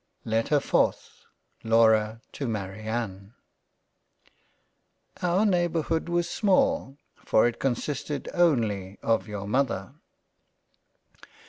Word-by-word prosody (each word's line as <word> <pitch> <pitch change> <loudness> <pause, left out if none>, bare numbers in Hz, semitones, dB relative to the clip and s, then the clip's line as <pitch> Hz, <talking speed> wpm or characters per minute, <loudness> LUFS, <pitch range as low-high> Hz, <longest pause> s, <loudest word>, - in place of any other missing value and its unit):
LETTER 115 +6 +1
4th - - -1 0.4
LAURA 110 -1 +3
to 140 - -4
MARIANNE 105 0 -4 1.9
OUR 180 +4 +2
neighbourhood 175 -3 0
was 175 0 0
small, 180 - +1 0.2
for 110 - +2
it 120 - -1
consisted 140 +2 -2
only 110 - +1
of 115 -1 +1
your 105 -2 -6
Mother. 115 -2 -1
115 Hz, 85 wpm, -26 LUFS, 110-160 Hz, 1.9 s, LAURA